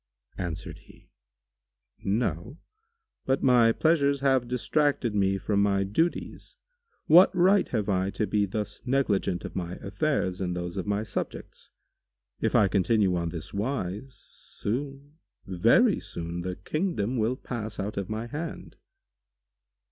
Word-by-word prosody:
Answered 90 Hz, -3 st, -5 dB
he, -, -, -20 dB, 0.9 s
"No: 105 Hz, -, -1 dB, 0.7 s
but 135 Hz, 0 st, +1 dB
my 120 Hz, -3 st, +5 dB
pleasures 140 Hz, 0 st, +2 dB
have 135 Hz, -3 st, +2 dB
distracted 125 Hz, -1 st, 0 dB
me 95 Hz, -1 st, +2 dB
from 100 Hz, +1 st, 0 dB
my 100 Hz, -1 st, +2 dB
duties. 160 Hz, -, -2 dB, 0.5 s
What 175 Hz, +4 st, +8 dB
right 190 Hz, +3 st, +4 dB
have 110 Hz, -4 st, -2 dB
I 95 Hz, -1 st, +1 dB
to 105 Hz, -, -1 dB
be 105 Hz, 0 st, +1 dB
thus 105 Hz, +1 st, -4 dB
negligent 105 Hz, -9 st, 0 dB
of -, -, -8 dB
my 90 Hz, -1 st, -3 dB
affairs 100 Hz, -3 st, -1 dB
and 90 Hz, -1 st, -2 dB
those 85 Hz, +1 st, -4 dB
of 95 Hz, +1 st, -4 dB
my 105 Hz, +1 st, 0 dB
subjects? 110 Hz, -, -6 dB, 0.7 s
If -, -, 0 dB
I 105 Hz, -, +5 dB
continue 100 Hz, 0 st, +2 dB
on 85 Hz, -1 st, -1 dB
this 80 Hz, -2 st, -7 dB
wise, 110 Hz, +2 st, -3 dB
soon, 140 Hz, +9 st, -6 dB, 0.3 s
very 90 Hz, -3 st, +3 dB
soon, 85 Hz, +1 st, -6 dB
the 90 Hz, +1 st, -4 dB
kingdom 130 Hz, -, -2 dB
will 115 Hz, +3 st, +1 dB
pass 110 Hz, -4 st, -6 dB
out 105 Hz, +2 st, -3 dB
of 100 Hz, -2 st, -4 dB
my 110 Hz, +2 st, -3 dB
hand." 150 Hz, +6 st, -7 dB
105 Hz, 135 wpm, -27 LUFS, 95-135 Hz, 0.9 s, What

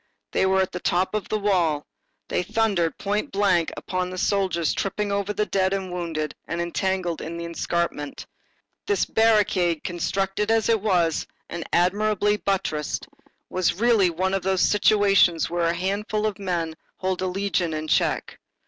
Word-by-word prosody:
They 190 Hz, -, +2 dB
were 190 Hz, 0 st, +3 dB
at 190 Hz, -, -1 dB
the 180 Hz, -, -4 dB
top 180 Hz, +3 st, 0 dB
of 215 Hz, -1 st, -3 dB
a 215 Hz, -, +2 dB
wall, 185 Hz, -7 st, +2 dB
and 145 Hz, -, -8 dB, 0.5 s
they -, -, +1 dB
thundered 190 Hz, -4 st, 0 dB
point 205 Hz, +1 st, -2 dB
blank 190 Hz, -4 st, +2 dB
upon 185 Hz, 0 st, -2 dB
the 185 Hz, -, -6 dB
soldiers 185 Hz, -4 st, +1 dB
tripping 200 Hz, +1 st, -2 dB
over 200 Hz, 0 st, -1 dB
the 210 Hz, 0 st, 0 dB
dead 190 Hz, -1 st, +1 dB
and 190 Hz, -2 st, -3 dB
wounded 160 Hz, -4 st, -3 dB
and 170 Hz, -, -3 dB
entangled 175 Hz, 0 st, -1 dB
in 165 Hz, +1 st, -5 dB
the 170 Hz, -, -5 dB
escarpment. 170 Hz, -3 st, -3 dB, 0.6 s
This 410 Hz, -, +2 dB
barricade, 205 Hz, -7 st, +2 dB
constructed 195 Hz, +4 st, -1 dB
as 225 Hz, 0 st, +2 dB
it 225 Hz, -3 st, +3 dB
was 175 Hz, -6 st, +1 dB, 0.2 s
and 170 Hz, -1 st, -5 dB
admirably 205 Hz, +3 st, +2 dB
buttressed, 185 Hz, -8 st, -2 dB, 0.4 s
was 185 Hz, -2 st, 0 dB
really 225 Hz, -5 st, +4 dB
one 185 Hz, +3 st, -1 dB
of 195 Hz, -, +1 dB
those 190 Hz, 0 st, +1 dB
situations 200 Hz, -6 st, +4 dB
where 170 Hz, -1 st, +1 dB
a 170 Hz, -, +1 dB
handful 205 Hz, +4 st, -1 dB
of 215 Hz, -1 st, -2 dB
men 175 Hz, -4 st, -2 dB, 0.2 s
hold 185 Hz, -1 st, -2 dB
a 185 Hz, -, 0 dB
legion 185 Hz, -2 st, -1 dB
in 155 Hz, 0 st, -4 dB
check. -, -, 0 dB
190 Hz, 165 wpm, -24 LUFS, 170-205 Hz, 0.6 s, really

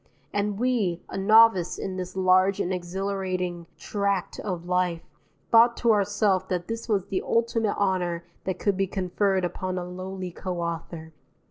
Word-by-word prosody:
And 205 Hz, 0 st, -1 dB
we, 215 Hz, -8 st, 0 dB
a -, -, -7 dB
novice 215 Hz, -3 st, +5 dB
in 190 Hz, -, -4 dB
this 185 Hz, 0 st, -5 dB
large 185 Hz, +1 st, +3 dB
and 185 Hz, -, 0 dB
exhilarating 185 Hz, -1 st, -3 dB
tract 200 Hz, -3 st, -2 dB
of 180 Hz, -4 st, -4 dB
life, 180 Hz, -2 st, 0 dB, 0.5 s
thought 235 Hz, +1 st, +6 dB
to 235 Hz, -, +3 dB
ourself 205 Hz, -2 st, +2 dB
that 175 Hz, -1 st, -2 dB
this 230 Hz, +1 st, -5 dB
was 200 Hz, -4 st, +1 dB
the 190 Hz, -, -2 dB
ultimate 230 Hz, -2 st, 0 dB
honour 180 Hz, -4 st, 0 dB, 0.2 s
that 190 Hz, -, -2 dB
could 200 Hz, -2 st, 0 dB
be 195 Hz, 0 st, +1 dB
conferred 190 Hz, 0 st, 0 dB
upon 185 Hz, +1 st, -3 dB
a 180 Hz, -, -3 dB
lowly 185 Hz, 0 st, -6 dB
co 180 Hz, +1 st, -5 dB
author. 165 Hz, -1 st, -5 dB
190 Hz, 155 wpm, -26 LUFS, 180-205 Hz, 0.5 s, thought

